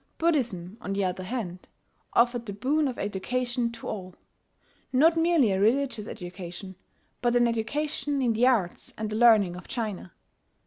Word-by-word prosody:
Buddhism, 235 - 0
on 195 - -3
the 200 0 0
other 185 0 -2
hand, 185 -6 -5 0.5
offered 240 0 +2
the 200 - -4
boon 285 +9 +1
of 255 - -4
education 240 +4 -1
to 230 - -9
all, 185 -4 -6 0.8
not 310 +6 +5
merely 325 - +3
a 190 0 0
religious 230 -1 +1
education, 180 +1 -8 0.5
but 240 0 +2
an 240 0 +5
education 285 +5 -1
in 245 -3 +2
the 235 +3 +3
arts 210 -9 0
and 215 0 -3
the - - -2
learning 215 -6 +5
of 180 - -10
China. 215 -6 -4
230 Hz, 160 wpm, -27 LUFS, 195-255 Hz, 0.8 s, not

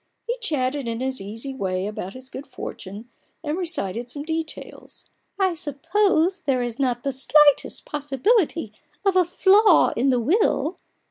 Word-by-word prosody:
He 475 - -1
chatted 285 - -1
in 230 0 -3
his 260 -3 -2
easy 225 +7 -7
way 190 -6 -2
about 200 -2 -5
his 255 0 -10
good 275 - -8
fortune, 210 -4 -8 0.4
and 300 0 -2
recited 245 - -3
some 285 +3 -6
details. 320 0 -6
" - - -38
I 380 -2 +2
suppose 345 +3 +1
there 260 -6 0
is 240 +1 -5
not 245 -3 0
the 275 - 0
slightest 290 +2 +3
possibility 295 - 0 0.3
of 390 -1 +3
a 370 - +6
flaw 380 +2 +5
in 260 +4 +2
the 250 -2 +3
will 315 - +1
280 Hz, 155 wpm, -23 LUFS, 245-345 Hz, 0.4 s, a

